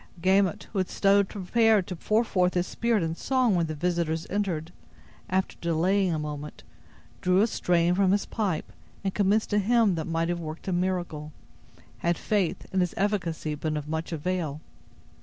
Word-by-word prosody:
Gamut, 190 0 +2
who 200 - 0
had 185 - 0
stood 200 0 +3
prepared 215 +1 +2
to 180 - -5
pour 215 +7 +1
forth 180 -5 +1
his 180 0 +2
spirit 230 -3 0
in 165 0 -1
song 255 +1 +1
when 170 -2 +1
the 155 - -4
visitors 170 0 -1
entered, 180 -5 -2 0.6
after 190 +1 0
delaying 180 +3 +2
a 160 - 0
moment, 150 -1 -6 0.6
drew 180 +1 +3
a - - +5
strain 175 -5 +2
from 190 0 +3
his 200 +1 +1
pipe, 200 -8 -2 0.3
and 195 -1 -1
commenced 205 +2 +1
a 210 - +4
hymn 225 0 +3
that 160 -2 -3
might 165 0 0
have 175 0 -1
worked 160 +3 -7
a 190 - 0
miracle, 175 -4 -2 0.7
had 170 0 +1
faith 200 -5 -1
in 190 - +2
its 180 - -1
efficacy 180 -6 -1
been 155 +1 -2
of 150 0 -5
much 160 +2 -3
avail. 160 -2 -2
180 Hz, 175 wpm, -27 LUFS, 165-200 Hz, 0.7 s, a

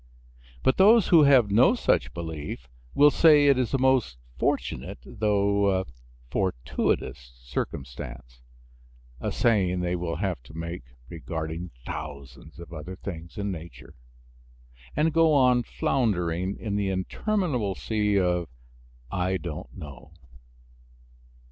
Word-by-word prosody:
But 130 - +3
those 210 +1 +6
who 160 -4 +7
have 130 -7 +5
no 125 - +5
such - - +1
belief 80 -6 -6 0.3
will 145 +1 +7
say 150 -2 +6
it 140 -2 +5
is 125 -3 0
a 135 - +2
most 130 - +2 0.2
fortunate - - -2
though 100 -2 +1 0.5
fortuitous 65 -7 -2
circumstance - - -6 0.8
(a - - -3
saying 95 -6 +2
they 90 0 -1
will 85 -1 -3
have 90 -6 -2
to 70 +6 -15
make, 85 -3 -6 0.2
regarding 80 +2 -5 0.2
thousands 70 0 -8
of 85 0 -11
other 85 +4 -7
things 85 -4 -8
in 100 -1 -2
nature), 85 -1 -10 1.0
and 155 +2 +2
go 165 -1 +4
on 125 -3 +4
floundering 95 -8 -1
in 105 -3 -4
the 100 -1 0
interminable 120 - -1
sea 105 -2 0
of 90 -3 0 0.6
"I 95 0 0
don't 85 -4 -7
know." 75 +1 -11
95 Hz, 120 wpm, -26 LUFS, 80-120 Hz, 1.0 s, who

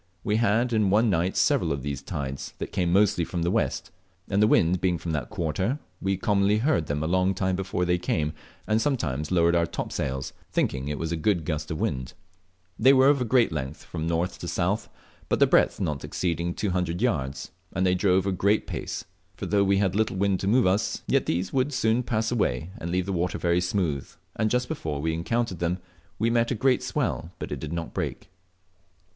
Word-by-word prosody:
We 105 - +1
had 115 +2 +2
in 105 -3 +3
one 110 +3 +4
night 90 +1 0
several - - +2
of 70 -2 -2
these 70 -2 -3
tides, 70 -1 -5
that - - -5
came 90 -2 0
mostly 95 -2 +3
from 85 0 -3
the 85 - +1
west, 85 - -1 0.4
and 100 +1 +1
the 105 - +6
wind 85 -3 +3
being 90 -2 +2
from 85 - -4
that 75 -6 -2
quarter 95 - -1 0.2
we 95 0 0
commonly 100 +1 +2
heard 115 - +1
them 75 +1 -1
a - - -1
long 95 +2 +2
time 95 0 0
before 95 -1 -1
they 90 0 +1
came, 75 -3 -1 0.3
and 110 +1 +2
sometimes 80 - -1
lowered 85 -1 +3
our 85 0 +2
topsails, 65 -3 -3 0.2
thinking 65 0 0
it 75 0 -2
was 80 0 -3
a - - 0
gust 80 -4 -1
of 80 - -3
wind. 65 -1 -2 0.7
They 135 - +7
were 135 +1 +6
of 130 -5 +2
great 125 -5 +4
length, 75 -1 -4
from 80 -1 -4
north 85 +2 -1
to 85 - -6
south, 90 +5 -1 0.4
but - - +2
their - - +5
breadth - - +3
not 75 -3 -2
exceeding 85 -1 -2
200 90 -4 -1
yards, 75 - -1 0.2
and 95 - 0
they 90 - +3
drove 95 0 +2
a 100 - +1
great 100 +3 +2
pace. - - -5 0.3
For - - -5
though 100 -1 +2
we 100 0 +3
had 95 -2 +1
little 110 -2 +1
wind 100 -1 +1
to 95 - -3
move 120 +4 +4
us, 95 +3 0
yet - - +1
these 90 +2 -1
world 135 +2 +1
soon 120 -2 +2
pass 115 -2 -1
away, 85 - 0
and 85 - -4
leave 90 +1 0
the 100 - -2
water 90 +1 -1
very 85 0 +1
smooth, 90 -6 -1 0.3
and 110 0 +1
just 125 +2 +1
before 80 - -3
we 80 +2 -1
encountered 95 +3 -1
them 85 +1 0 0.4
we 115 +2 +1
met 115 0 +2
a 125 - 0
great 130 +3 +2
swell, 80 - -2
but - - -6
it 70 - -3
did 75 +1 -6
not 85 -1 -4
break." - - -4
90 Hz, 210 wpm, -26 LUFS, 80-105 Hz, 0.7 s, They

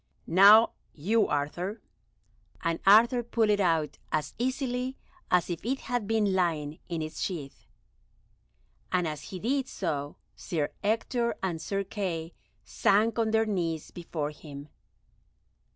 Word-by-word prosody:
"Now 205 +6 +7 0.2
you, 215 +9 +2
Arthur," 175 +9 -2 0.8
and 165 0 0
Arthur 235 +5 +7
pulled 230 -2 +1
it 205 - +2
out 165 -6 +1
as 155 -1 -1
easily 255 0 -2 0.3
as 180 -1 +3
if 175 -2 -4
it 265 +5 -1
had 245 -5 -2
been 215 -3 +2
lying 160 -5 0
in 165 -2 -2
its 155 0 -6
sheath, 150 -8 -5 1.2
and 180 -2 +1
as 150 -2 -5
he 190 - -7
did 265 +6 0
so 145 - -3 0.2
Sir 155 -4 -2
Ector 235 +3 0
and 170 -4 -2
Sir 195 +4 -2
Kay 180 -5 -4 0.3
sank 220 +3 +2
on 225 -1 +2
their 220 0 +3
knees 170 -7 -2
before 160 -4 -4
him. 145 -1 -10
190 Hz, 135 wpm, -28 LUFS, 160-225 Hz, 1.2 s, Now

